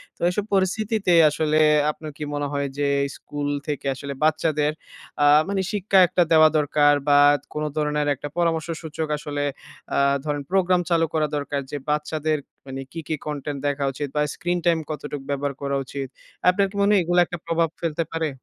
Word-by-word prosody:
তো - - -35
এইসব 200 +3 -2
পরিস্থিতিতে 195 0 +1 0.2
আসলে 155 +1 +1 0.3
আপনার 155 0 -9
কি 150 - -5
মনে 145 0 -1
হয়? 140 0 -1
যে 145 - 0 0.2
এই 140 - -2
স্কুল 145 -1 -5 0.2
থেকে 145 -2 -3
আসলে 140 +1 -6
বাচ্চাদের 155 -1 +2 0.5
আ - - +5 0.2
মানে 195 -1 0
শিক্ষা 200 -1 +2
একটা 175 0 +2
দেওয়া 155 -1 +7
দরকার 145 0 +3
বা 145 0 +6 0.3
কোন 150 - -3
ধরনের 150 -1 0
একটা 140 - -7
পরামর্শ 165 -2 +1
সূচক 160 -1 -4
আসলে 145 -1 -4 0.5
আ - - +1 0.3
ধরেন 145 -1 -2
প্রোগ্রাম 185 -2 +3
চালু 165 -1 +3
করা 155 -1 +1
দরকার 140 -1 -2
যে 145 - -3
বাচ্চাদের 155 +1 0 0.3
মানে 135 0 -6
কী 165 - -6
কী 160 - -1
content 145 -1 -4
দেখা 145 0 -1
উচিত? 145 +2 -4
বা 150 - +2
স্ক্রিন 175 0 -1
টাইম 170 -1 +3
কতটুক 145 -2 -5
ব্যবহার 140 0 -1
করা 140 0 -1
উচিত? 135 +1 -5 0.4
আপনার 195 +2 +3
কি - - -13
মনে 200 +1 +4
হয় 200 - +4
এগুলো 175 +1 +2
একটা 175 - -6
প্রভাব 165 0 +1
ফেলতে 165 -1 -1
পারে? 165 -1 -1
155 Hz, 185 wpm, -23 LUFS, 145-170 Hz, 0.5 s, দেওয়া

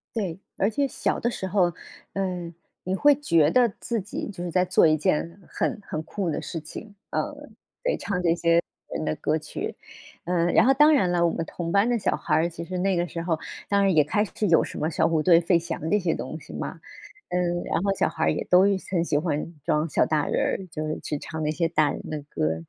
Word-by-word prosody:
对， 190 -7 -2 0.2
而 195 - +2
且 280 +6 0
小 - - -1
的 240 - 0
时 190 - -4
候， 180 -2 +2 0.4
嗯， 180 -3 -3 0.3
你 185 - -2
会 290 +9 +5
觉 170 - +3
得 240 +4 +4
自 230 -3 -2
己 200 - -5
就 185 -4 -6
是 175 - -4
在 180 +1 +3
做 - - +4
一 155 -1 +4
件 165 +4 -1
很 - - -2
很 155 - -3
酷 190 +1 -3
的 155 - -2
事 165 - -5
情， 200 +7 -10 0.2
嗯， - - +1 0.6
得 - - +1
唱 180 -3 -2
这 170 -1 +2
些 170 0 +3 0.3
人 - - -3
的 - - 0
歌 155 +1 0
曲， 155 - -5 0.5
嗯， 175 -1 +1
然 220 - +6
后 265 - +6
当 295 +3 +6
然 225 -11 +3
了， 175 -1 +2
我 170 - +2
们 165 - -3
同 170 0 -5
班 200 +4 +4
的 240 - +2
小 210 - 0
孩 - - 0
儿， 165 +2 +2
其 170 0 -7
实 180 +2 -4
那 190 0 +1
个 175 +1 0
时 170 - -5
候 165 -2 -1 0.3
当 200 0 +3
然 195 -3 +3
也 155 - +6
开 205 +8 +1
始 215 - -3
有 165 -2 +5
什 - - -5
么 155 - 0
小 165 - +2
虎 160 -2 +1
队、 170 -1 +6
费 170 +1 +3
翔 165 -1 -4
这 210 - +4
些 180 -5 0
东 160 - -5
西 - - -13
嘛， - - -6 0.5
嗯， 175 -1 0
然 - - -1
后 195 0 +1
小 - - +1
孩 - - -1
儿 - - +3
也 - - -2
都 180 +1 +7
很 190 -3 +1
喜 150 -3 +1
欢 160 +1 -2
装 150 +2 +1
小 150 - +2
大 155 -2 0
人 - - 0
儿， 190 - -2
就 155 -1 -4
是 155 - -3
去 150 - -3
唱 160 +2 -6
那 150 - 0
些 165 +2 0
大 155 -2 +3
人 - - -4
的 155 -1 -4
歌。 80 - -1
175 Hz, 260 characters per minute, -25 LUFS, 160-195 Hz, 0.6 s, 都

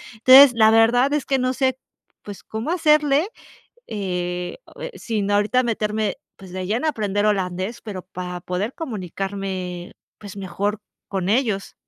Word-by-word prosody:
entonces, 260 +3 +8
la 220 -1 +6
verdad 245 +5 +4
es 295 -2 0
que 270 - +2
no 255 +1 0
sé, 260 -1 0 0.5
pues 205 -2 -9
cómo 220 +9 -4
hacerle, 300 -2 +3 0.6
eh 180 -3 -3 0.2
eh, - - -5
sin 210 -3 -2
ahorita 215 +5 +2
meterme, 215 -3 -1 0.2
pues, 190 -2 -13
de 185 -1 -4
lleno 240 +9 0
a - - +4
aprender 205 -4 -1
holandés, 190 +1 -1
pero 200 -5 -6
para 180 -1 -7
poder 185 +8 -3
comunicarme, 190 - -5 0.3
pues, 205 -1 -10
mejor 200 +3 -3 0.3
con 190 -1 -2
ellos. 220 -4 0
210 Hz, 145 wpm, -22 LUFS, 190-245 Hz, 0.6 s, entonces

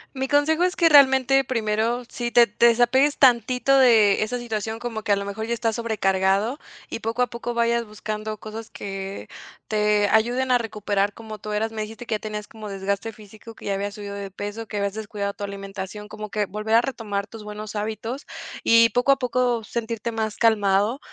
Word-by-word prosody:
Mi 265 0 -2
consejo 295 +4 +2
es 360 0 +1
que 335 -2 +4
realmente 270 -2 +6
primero, 230 0 -1
si 240 -1 -4
te 240 0 +7
te 230 +2 +3
desapegues 245 +5 +3
tantito 250 +1 +4
de 220 -6 +5
esa 240 +3 -1
situación 225 -2 -4
como 230 -2 -5
que 210 - -2
a - - +6
lo 200 0 -4
mejor 220 +3 -5
ya 235 - 0
estás 225 -1 -1
sobrecargado 205 +1 +1 0.3
y - - -5
poco 230 +2 0
a - - 0
poco 235 0 -5
vayas 235 0 +2
buscando 215 0 -5
cosas 220 +1 -8
que 195 0 -6 0.4
te 210 -1 +2
ayuden 245 +4 +2
a 245 - +5
recuperar 205 -2 -1
como 220 -2 -9
tú 215 - -7
eras, 220 +2 -1
me 220 - -4
dijiste 220 +3 -7
que 230 - -3
ya - - -3
tenías 210 -1 -6
como 215 -2 -9
desgaste 200 +3 -3
físico, 215 +1 -14
que - - -13
ya 200 - 0
habías 200 +1 -3
subido 205 -2 -7
de 200 -1 -6
peso, 205 +3 -6
que 210 - -5
habías 200 -1 -1
descuidado 205 -2 -4
tu 205 - -8
alimentación, 195 +1 -7
como 215 0 -8
que 210 0 -1
volver 215 +3 -1
a 230 - +7
retomar 220 -6 -3
tus 215 +1 -11
buenos 210 +1 -7
hábitos 220 +5 -4 0.4
y 230 0 +6
poco 245 +5 +3
a - - +1
poco 250 -2 0
sentirte 230 0 -4
más 220 -1 -3
calmado 210 +2 +2
220 Hz, 200 wpm, -23 LUFS, 205-235 Hz, 0.4 s, te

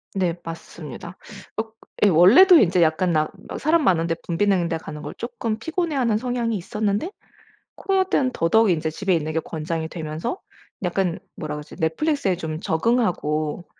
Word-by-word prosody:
네, 180 -3 0
맞습니다. 165 +1 -9 0.4
억 220 0 -3 0.3
예 205 - +7
원래도 235 - +8
이제 180 - +4
약간 165 +3 +2
나 155 0 +1 0.2
막 - - -6
사람 315 +2 +3
많은 170 -7 +2
데 165 - 0
붐비는 180 0 +1
데 165 - -1
가는 150 -1 -8
걸 150 - -6
쪼끔 235 -2 -4
피곤해 325 +4 -2
하는 235 -5 +2
성향이 240 -1 -1
있었는데 210 - -2 0.6
코로나때는 375 -9 +1
더더욱 220 +6 +3
인제 160 -2 0
집에 185 +5 -1
있는게 155 0 -1
권장이 160 0 -4
되면서 160 - -5 0.4
약간 180 -1 0 0.2
뭐라 150 -1 -5
그러지? 150 +1 -9
Netflix에 230 - 0
좀 160 -2 -5
적응하고 165 -5 0
180 Hz, 360 characters per minute, -23 LUFS, 160-230 Hz, 0.6 s, 원래도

